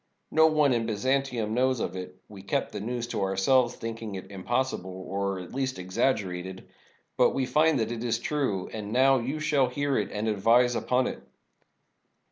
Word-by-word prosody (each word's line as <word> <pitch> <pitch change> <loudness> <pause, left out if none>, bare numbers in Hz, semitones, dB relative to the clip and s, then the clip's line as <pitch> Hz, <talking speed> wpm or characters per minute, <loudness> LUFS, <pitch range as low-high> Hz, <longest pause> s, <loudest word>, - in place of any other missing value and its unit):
No 160 0 +6
one 150 -4 +3
in 115 -1 0
Byzantium 120 0 0
knows 130 +1 +2
of 90 - -3
it 90 0 -7
— - - -44
we 100 -2 -11
kept 100 - -2
the 105 - -5
news 120 +3 -3
to - - -2
ourselves, 120 +6 +2
thinking 115 -2 -6
it 95 0 -8
impossi 120 +5 -1
ble, 95 - -9
or 95 +1 -3
at 90 - -9
least 130 0 -2
exaggerated. 95 -2 -2 0.5
But - - +4
we 135 - +1
find 155 0 +3
that 115 - -1
it 120 -1 -4
is 115 -2 0
true; 120 -8 -1
and 105 -1 -5
now 130 +2 +4
you 135 +6 -3
shall 150 -4 +2
hear 140 +1 0
it 105 - -2
and 105 +2 -2
advise 115 +4 +3
upon 125 +1 +1
it. - - -4
115 Hz, 190 wpm, -27 LUFS, 100-130 Hz, 0.5 s, No